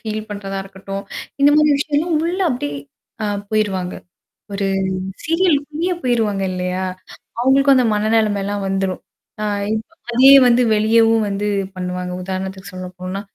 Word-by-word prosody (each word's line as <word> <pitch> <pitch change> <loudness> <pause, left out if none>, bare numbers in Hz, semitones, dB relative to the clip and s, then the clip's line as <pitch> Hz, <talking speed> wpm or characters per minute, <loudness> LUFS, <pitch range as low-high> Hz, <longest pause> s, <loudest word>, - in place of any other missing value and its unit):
Feel 215 0 -5
பண்றதா 195 -1 -5
இருக்கட்டும். 195 +1 -7 0.4
இந்த 285 - +7
மாதிரி 300 -1 +4
விஷயம்லாம் 305 +3 0
உள்ள 360 +3 -2
அப்படியியே 145 - -3 0.5
ஆ - - 0 0.2
போயிருவாங்க. 195 -4 -1 0.6
ஒரு 200 0 -1 0.6
சீரியல்குள்ளயே 330 0 +1
போயிருவாங்க 225 -6 0
இல்லையா? 180 +1 -2 0.6
அவங்களுக்கும் 270 +2 +4
அந்த 250 -2 +3
மனநெலைமைலாம் 210 -2 0
வந்துரும். 190 -1 -2 0.4
ஆ - - -1 0.3
இப்ப 220 +6 -5 0.2
அதே 260 +3 +7
வந்து 245 0 +4
வெளியவும் 225 +1 +3
வந்து 200 +1 -2 0.3
பண்ணுவாங்க. 180 0 -4
உதாரணத்துக்கு 190 -1 -5
சொல்லப்போனா. 185 +1 -6
210 Hz, 120 wpm, -19 LUFS, 190-255 Hz, 0.6 s, இந்த